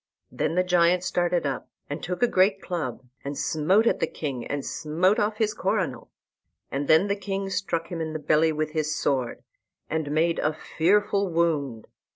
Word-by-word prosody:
Then 165 - -1
the 180 - +3
giant 180 0 +3
started 175 -2 0
up, 135 -2 -3 0.2
and 145 +3 -5
took 180 +6 -3
a - - +6
great 195 -1 +3
club, 155 -11 -4 0.2
and 140 0 -5
smote 185 +8 +2
at - - +2
the - - +1
king, 135 -6 -4
and 145 -1 -3
smote 175 +7 +1
off 210 +1 0
his 215 -1 +1
coronal; 185 - -2 0.6
and 140 +1 -2
then 160 +5 +6
the 200 - +1
king 195 -1 -4
struck 175 -3 -2
him 170 -2 -4
in 160 -1 -3
the - - -2
belly 155 +1 +3
with 155 0 -2
his 155 -1 -1
sword, 130 -4 -1 0.5
and 160 -2 -1
made 165 +3 +1
a 155 - +1
fearful 200 +5 +1
wound. 150 -9 0
165 Hz, 185 wpm, -26 LUFS, 150-190 Hz, 0.6 s, a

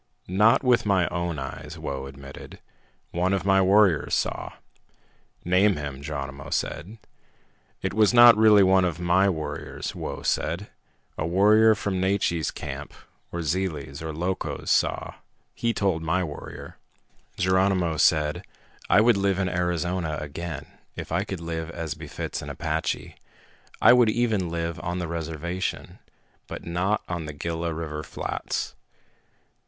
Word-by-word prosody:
"Not 105 +8 +4
with 125 -2 +4
my 95 -4 +2
own 85 -2 -2
eyes," 75 +3 -7
Whoa 70 -4 -5
admitted. 70 0 -11 0.5
"One 90 +3 0
of 95 - -1
my 95 -1 +4
warriors 95 -4 +4
saw." - - -2 0.9
"Name 95 +3 +4
him," 70 -2 -6
Geronimo 70 -2 -6
said. 95 +10 -3 0.9
"It - - -1
was 110 0 +4
not 120 -1 +9
really 105 -2 +6
one 95 0 +4
of 90 -2 -1
my 90 +3 +3
warriors," 80 -4 -4
Whoa - - -6
said. 85 +6 -1 0.5
"A 80 - -1
warrior 105 +5 +5
from 95 -3 -2
Naiche's 95 -4 +1
camp, - - -7 0.4
or 85 0 -3
Zele's, 75 -4 -2
or 80 -1 -4
Loco's, 90 +4 -3
saw. - - +1 0.4
He 115 - 0
told 95 -7 0
my 90 +3 0
warrior." 75 -4 -8 0.6
Geronimo 95 -2 +2
said, 75 0 +2 0.5
"I 105 - +6
would 115 -1 +4
live 100 -1 +1
in 95 -1 0
Arizona 90 -2 -1
again, 80 +3 -6 0.3
if - - -7
I - - +1
could 95 - -5
live 80 -1 -4
as 80 -3 -4
befits 75 -1 -6
an - - -7
Apache. 80 0 -3 0.6
I - - +7
would 120 -3 +5
even 110 -6 +1
live 85 0 -3
on 90 +1 -3
the 90 -1 -3
reservation, 85 +3 -4 0.5
but - - -8
not 90 +5 0
on 85 -3 -4
the 75 - -6
Gila 85 +3 -3
River 80 -1 -4
flats." - - -4
85 Hz, 140 wpm, -25 LUFS, 80-95 Hz, 0.9 s, not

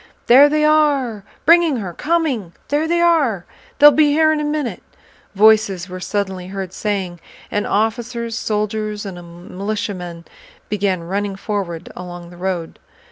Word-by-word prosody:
"There 275 +4 +7
they 305 0 +2
are... 285 -8 +2 0.2
bringing 335 -2 +5
her, 195 -7 -5
coming... 290 - -1 0.2
There 295 +2 +1
they 340 +1 +1
are... 285 - +2 0.3
They'll 295 +1 +9
be 295 +1 +3
here 315 +1 +4
in 310 - -1
a - - -2
minute..." 295 -4 -2 0.5
voices 205 -3 +4
were 185 0 -7
suddenly 190 -1 -3
heard 190 -1 -6
saying; 190 -4 -3 0.3
and 205 - -1
officers, 230 +2 -1
soldiers, 210 0 -2
and 195 -2 -6 0.4
militiamen 185 -4 -4 0.4
began 195 -3 0
running 195 +3 -3
forward 190 -5 -4
along 175 -1 -9
the 175 - -13
road. 180 -2 -4
210 Hz, 140 wpm, -19 LUFS, 185-290 Hz, 0.5 s, They'll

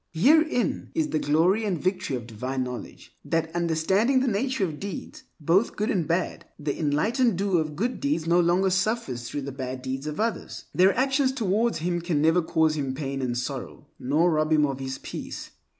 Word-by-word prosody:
Herein 285 - +3
is 320 -2 +1
the 155 - 0
glory 170 +10 +2
and 195 -5 0
victory 185 -5 -1
of 120 -3 -5
divine 125 +4 -3
knowledge, 125 -1 -8
that 160 +2 -1
understanding 175 +10 +2
the 260 - 0
nature 245 +1 0
of 155 -4 -6
deeds, 200 -1 -7
both 170 +9 +2
good 215 +4 0
and 175 -6 0
bad, 170 +3 -1
the 145 -1 -2
enlightened 205 - +1
doer 190 -3 +2
of 155 -1 -5
good 240 +8 -1
deeds 280 - 0
no 170 +1 +4
longer 180 +2 +3
suffers 185 - -1
through 145 - -3
the 140 - -5
bad 130 -1 -5
deeds 135 +2 -4
of 150 - -4
others. 225 +1 -3
Their 190 +4 +4
actions 270 +1 +2
towards 225 -1 +1
him 175 +1 -1
can 170 -3 0
never 160 +4 +4
cause 160 -1 +2
him 135 -3 -2
pain 135 -1 -3
and 120 -2 -1
sorrow, 125 - -5
nor 155 +7 +2
rob 155 0 +1
him 150 -1 +5
of 135 -2 -3
his 135 0 -4
peace. - - -7
170 Hz, 195 wpm, -26 LUFS, 145-205 Hz, -, him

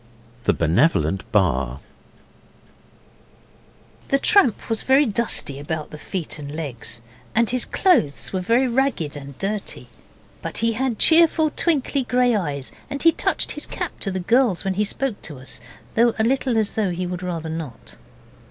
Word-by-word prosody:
THE - - +4
BENEVOLENT 85 - +1
BAR 70 - +1 2.3
The 275 - +3
tramp 275 - +3
was 225 -2 -1
very 270 +3 +4
dusty 210 - +1
about 155 +1 -4
the 150 - -9
feet 165 -2 -4
and 145 -1 -7
legs, 130 -7 -5 0.3
and 230 +1 +4
his 250 +1 +1
clothes 250 - +1
were 190 - 0
very 235 +7 +2
ragged 235 - 0
and 140 -2 -9
dirty, 200 +1 -3 0.5
but - - -4
he 230 0 +1
had 250 0 -1
cheerful 320 0 +5
twinkly 285 -4 +1
grey 245 -1 +2
eyes, 145 -9 -2 0.2
and 280 - -4
he 330 - +7
touched - - 0
his - - -4
cap - - -5
to 200 - -3
the 190 -1 -2
girls 230 0 +2
when 195 - 0
he 205 +3 +1
spoke 245 +1 -2
to 150 - -7
us, 130 +1 -5 0.3
though 235 0 +3
a 220 - +2
little 255 0 +1
as 215 -2 +1
though 215 -3 0
he 180 +1 -3
would 180 0 -4
rather 170 -3 -4
not. 160 -8 -7
200 Hz, 160 wpm, -22 LUFS, 150-250 Hz, 2.3 s, he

